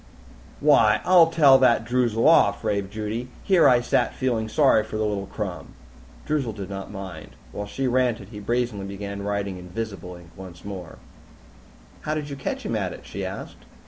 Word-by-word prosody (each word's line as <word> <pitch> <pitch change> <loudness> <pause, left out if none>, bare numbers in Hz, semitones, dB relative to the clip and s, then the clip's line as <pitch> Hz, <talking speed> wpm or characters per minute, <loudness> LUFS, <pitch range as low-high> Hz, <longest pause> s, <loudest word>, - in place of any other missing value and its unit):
"Why, 105 0 +5
I'll 180 -2 +7
tell 145 -5 +6
that 120 -3 +3
Droozle 120 -1 +1
off!" 100 -11 +4
raved 100 -1 -1
Judy. 110 +3 -4 0.2
"Here 185 -4 +5
I 125 -1 +4
sat 120 - 0
feeling 115 -4 -1
sorry 135 -4 +4
for 110 0 -6
the 110 - 0
little 100 -2 -2
crumb!" 95 -5 -6 0.5
Droozle 140 -7 -1
did 100 -2 -7
not 95 0 -6
mind. 95 -6 -9 0.2
While 105 0 -5
she 135 +6 -3
ranted, 125 -5 0
he 105 -2 -9
brazenly 115 -2 -2
began 100 0 -6
writing 100 -2 -3
in 90 0 -11
visible 90 -3 -6
ink 85 -1 -15
once 95 -2 -11
more. 95 -4 -8 1.0
"How 155 - -2
did 150 -2 -4
you - - -4
catch 135 - -4
him - - -2
at - - -2
it?" - - -12
she - - -6
asked. - - -7
105 Hz, 180 wpm, -24 LUFS, 100-125 Hz, 1.0 s, I'll